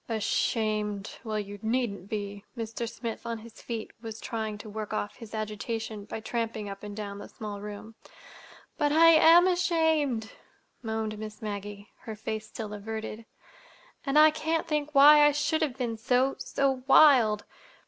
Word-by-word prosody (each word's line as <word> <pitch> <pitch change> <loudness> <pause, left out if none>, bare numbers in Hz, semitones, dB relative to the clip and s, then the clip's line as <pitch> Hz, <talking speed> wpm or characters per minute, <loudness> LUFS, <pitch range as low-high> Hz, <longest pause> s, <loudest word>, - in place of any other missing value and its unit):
"Ashamed! 215 -2 -1
Well, 215 -2 -2
you 205 0 -7
needn't 220 -4 -2
be." 205 -1 -4
Mr. 230 0 -4
Smith, 230 -1 -6
on 230 -1 -3
his 225 +1 -13
feet, 230 -2 -5
was 225 -1 -7
trying 220 -3 -4
to 210 - -10
work 215 0 -5
off 205 -1 -3
his 225 -3 -9
agitation 215 0 -4
by 220 - -6
tramping 225 -2 -3
up 195 0 -7
and 205 0 -8
down 200 -1 -5
the - - -9
small 205 -2 -7
room. 210 +2 -8 0.9
"But 295 -2 +2
I 330 +2 +7
am 330 +2 +7
ashamed," 320 -10 +1 0.5
moaned 220 -2 -3
Miss 215 -1 -7
Maggie, 205 0 -6
her 220 - -7
face 220 0 -5
still 215 -2 -7
averted. 220 +1 -6 0.8
"And 275 +1 0
I 310 0 +8
can't 320 +1 -1
think 300 -1 -2
why 295 +2 +9
I 295 0 +5
should 305 +2 0
have 275 -5 -1
been 235 -3 -2
so—so 260 +2 0
wild. 250 -8 +6
225 Hz, 160 wpm, -28 LUFS, 210-275 Hz, 0.9 s, why